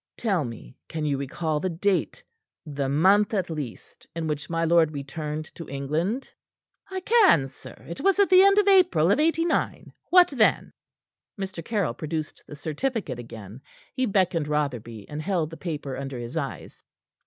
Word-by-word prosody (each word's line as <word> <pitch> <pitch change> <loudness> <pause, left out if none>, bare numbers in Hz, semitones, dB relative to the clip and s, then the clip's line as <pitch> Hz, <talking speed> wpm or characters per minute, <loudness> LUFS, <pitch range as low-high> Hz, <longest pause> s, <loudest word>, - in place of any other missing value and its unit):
Tell 195 -8 0
me 115 - -9
can 155 -1 -3
you 145 -2 +1
recall 150 +3 -2
the 185 - -1
date, 185 +3 -1 0.4
the 140 -3 -3
month 195 +9 +4
at 180 -4 -1
least, 145 -7 -7
in 165 -1 -3
which 150 -2 -3
my 165 0 0
lord 165 -1 +4
returned 150 +1 -5
to 165 - -9
England?" 155 - -2 0.6
"I 380 0 -4
can, 390 - +5
sir. 130 - -13
It 170 - -6
was 390 0 +3
at 400 -1 +5
the 370 0 +8
end 395 +1 +5
of 415 -1 +4
April 200 - +5
of 235 - +3
'89. 330 +2 0 0.2
What 360 0 +7
then?" 245 -6 +2 0.7
Mr. 190 -3 -5
Caryll 200 - -1
produced 155 +3 -5
the - - -9
certificate 155 - -3
again. 115 0 -10 0.3
He 255 -1 0
beckoned 185 -6 +1
Rotherby, 120 -8 -3
and 150 +1 -5
held 170 -3 -1
the - - -7
paper 150 -6 -5
under 135 -1 -5
his 120 +4 -7
eyes. 140 -4 -5
160 Hz, 165 wpm, -25 LUFS, 145-205 Hz, 0.7 s, the